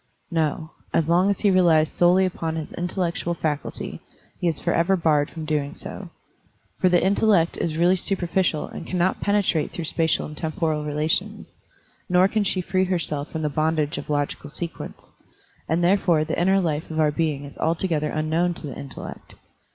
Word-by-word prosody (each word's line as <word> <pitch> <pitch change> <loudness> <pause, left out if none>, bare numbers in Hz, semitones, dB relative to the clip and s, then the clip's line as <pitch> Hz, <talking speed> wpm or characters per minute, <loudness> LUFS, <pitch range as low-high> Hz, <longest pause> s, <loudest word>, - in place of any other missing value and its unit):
No; 160 -1 -1 0.2
as 160 - +2
long 180 +4 +4
as 200 - 0
he 205 - +4
relies 170 -4 +4
solely 180 +3 +4
upon 165 -3 -3
his 160 -2 -5
intellec 175 -1 -2
tual 170 0 -2
faculty, 150 -2 -3 0.4
he 175 - 0
is 160 -3 0
forever 170 +2 +2
barred 150 -4 +2
from 160 - -7
so - - -5
doing. 150 -2 -1 1.0
For 185 - +4
the 175 0 +3
intellect 195 -3 +3
is 160 -2 -2
really 175 +2 +4
superficial 180 -3 0
and - - -8
cannot 180 0 0
penetrate 200 -7 +1
through 170 - -4
spatial 160 0 +1
and 150 - -8
temporal 155 -1 -1
relations, 150 +2 -2 0.5
nor 180 +1 +5
can 215 +1 0
she 190 -1 0
free 185 +1 +1
herself 160 -5 -1
from 160 -1 -3
the 150 - +1
bondage 155 +1 0
of - - -9
logical 145 0 -2
sequence; 165 +2 -7 0.6
and 165 +3 +1
therefore 175 -3 +3
the 160 +2 -2
inner 190 +2 +4
life 160 -4 -1
of 160 -1 -3
our 155 -1 +4
being 150 -3 -1
is 140 - -12
altogether 160 -2 0
unknown 160 +3 0
to - - -8
the 140 - -6
intellect. 135 -3 -9
165 Hz, 175 wpm, -24 LUFS, 155-180 Hz, 1.0 s, nor